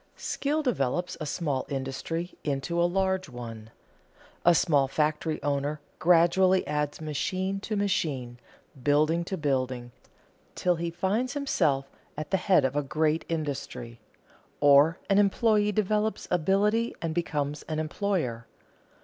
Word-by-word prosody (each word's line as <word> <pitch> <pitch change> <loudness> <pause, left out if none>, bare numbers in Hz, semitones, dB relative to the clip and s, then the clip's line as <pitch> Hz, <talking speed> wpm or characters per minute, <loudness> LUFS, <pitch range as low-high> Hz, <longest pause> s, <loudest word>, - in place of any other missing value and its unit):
_ - - -24
Skill 300 +2 -1
develops 180 - -1
a 155 - -3
small 145 -4 -2
industry 140 +6 -4
into 150 +4 -1
a 175 - +3
large 190 -1 0
one. 115 -3 -8 0.7
A 175 0 +6
small 145 -5 +3
factory 155 +2 0
owner 145 +1 -1 0.2
gradually 180 +2 +4
adds 150 -1 -2
machine 185 +6 -2
to 215 +2 -4
machine, 140 -12 -1 0.4
building 155 +5 +2
to 190 - -3
building, 130 -5 -1 0.6
till 180 -2 +1
he 170 +1 -2
finds 195 +9 -1
himself 145 - +1 0.3
at 155 +2 -5
the 190 - +3
head 185 -4 +3
of 130 +1 -1
a 145 - +2
great 155 +3 0
industry. 140 -7 -4 0.6
Or 145 +4 +6
an 200 0 +4
employee 210 +1 +3
develops 215 +1 0
ability 200 +7 +2
and 165 -1 -2
becomes 150 -3 -2
an 155 - -2
employer. 155 - -2
160 Hz, 130 wpm, -28 LUFS, 140-190 Hz, 0.7 s, A